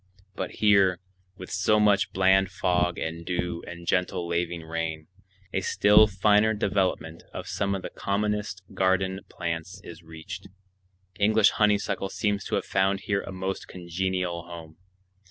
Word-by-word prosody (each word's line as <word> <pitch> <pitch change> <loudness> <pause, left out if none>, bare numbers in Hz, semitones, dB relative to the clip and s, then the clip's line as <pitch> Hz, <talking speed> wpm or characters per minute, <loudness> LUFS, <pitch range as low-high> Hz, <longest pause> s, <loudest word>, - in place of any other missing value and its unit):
But - - -4
here, 100 -4 +4 0.4
with 90 - -9
so 95 +4 +2
much 105 -2 +3
bland 95 0 +3
fog 90 -2 0
and 85 +1 -4
dew 90 -1 -2
and 85 0 -9
gentle 90 -1 0
laving 85 0 -2
rain, 80 -1 -4 0.5
a - - 0
still 105 +1 +5
finer 105 +2 +3
development 95 -5 -1
of - - -5
some 100 0 -1
of 95 - -5
the - - -6
commonest 105 -1 -2
garden 95 0 +1
plants 85 +2 -4
is 85 0 -10
reached. 85 +5 -9 0.7
English 110 +1 +5
honeysuckle 105 -2 +1
seems 100 -1 -1
to - - -1
have - - -1
found 95 0 +1
here 100 -1 -1
a - - -8
most 95 +1 -4
congenial 90 -1 -3
home. 80 -2 -10
95 Hz, 145 wpm, -26 LUFS, 85-100 Hz, 0.7 s, still